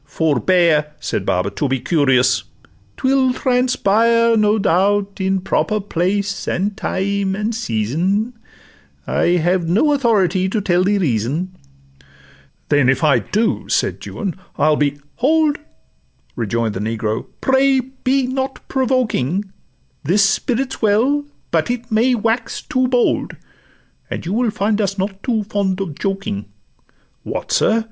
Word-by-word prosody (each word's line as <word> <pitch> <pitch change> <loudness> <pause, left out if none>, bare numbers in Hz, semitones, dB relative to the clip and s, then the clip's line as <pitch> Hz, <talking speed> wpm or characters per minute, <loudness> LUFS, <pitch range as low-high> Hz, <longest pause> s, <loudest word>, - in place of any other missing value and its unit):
'—'Forbear,' 150 - +2
Said - - -3
Baba, 90 +2 0
'to 145 - -2
be 135 0 0
curious; 130 -3 +2 0.5
'twill 260 -1 +2
transpire, 230 -3 +2
No 215 0 +3
doubt, 200 +1 +1
in 190 0 0
proper 215 +3 0
place, 195 +1 -2
and 200 +3 -1
time, 195 0 -1
and 215 +3 -2
season: 185 - -1 0.7
I 175 +1 +1
have 175 0 0
no 265 - +3
authority 195 - +2
to 215 - -1
tell 180 -2 +1
the 205 +2 +2
reason.' 155 - -1 1.1
'Then 145 -4 +3
if 135 +5 +1
I 150 -3 +4
do,' 220 +1 -1
said - - 0
Juan, 195 -5 -4 0.2
'I'll 155 +1 +3
be 145 -1 0 0.2
'—'Hold!' 305 +2 +2 0.8
Rejoin'd 115 0 -1
the 95 - -4
negro, 110 +1 -2
'pray 265 0 +3
be 260 +1 -1
not 265 +1 -4
provoking; 215 - 0 0.5
This 190 +8 +3
spirit 245 +7 0
's - - -9
well, 245 +7 +2 0.3
but 160 +3 +1
it 240 -1 -4
may 235 +4 +3
wax 225 +1 -1
too 255 0 0
bold, 245 -1 +1 0.7
And - - -5
you 180 - -2
will 240 +1 +1
find 210 +1 0
us 200 0 -1
not 195 0 -3
top 225 -5 -1
fond 195 -3 -1
of 190 -6 -3
joking.' 195 - -3 0.8
'What, - - -5
sir! 225 - +3
200 Hz, 135 wpm, -19 LUFS, 165-235 Hz, 1.1 s, I